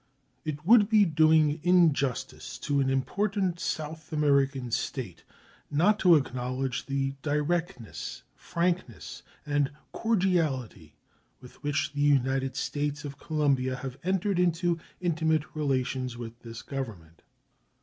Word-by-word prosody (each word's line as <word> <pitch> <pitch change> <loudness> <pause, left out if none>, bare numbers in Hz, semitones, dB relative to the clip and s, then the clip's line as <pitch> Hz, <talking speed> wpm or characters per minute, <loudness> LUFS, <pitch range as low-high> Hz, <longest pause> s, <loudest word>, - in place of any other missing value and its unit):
It 155 0 -5
would 215 0 +6
be 215 -2 +5
doing 155 -1 +4
injustice 160 -7 +1
to 145 -1 -1
an 135 -1 +2
important 190 +6 0
South 155 0 -4
American 140 -4 +1
State - - -3 0.5
not 190 +8 +3
to 180 -3 +6
acknowledge 130 -1 -2
the 135 0 -1
directness, 150 - -2
frankness, 170 - -3 0.2
and 145 -1 +1 0.2
cordiality 155 - 0 0.4
with 125 -1 -15
which 145 0 -1
the 145 - -2
United 135 -2 +2
States 145 +2 -2
of 140 -1 -7
Colombia 140 -5 0
have 135 -1 -7
entered 190 +1 0
into 175 -1 +1 0.2
intimate 160 -3 +1
relations 130 -4 -1
with 120 0 -8
this 115 -1 -9
Government. 105 - -7
145 Hz, 115 wpm, -28 LUFS, 130-170 Hz, 0.5 s, would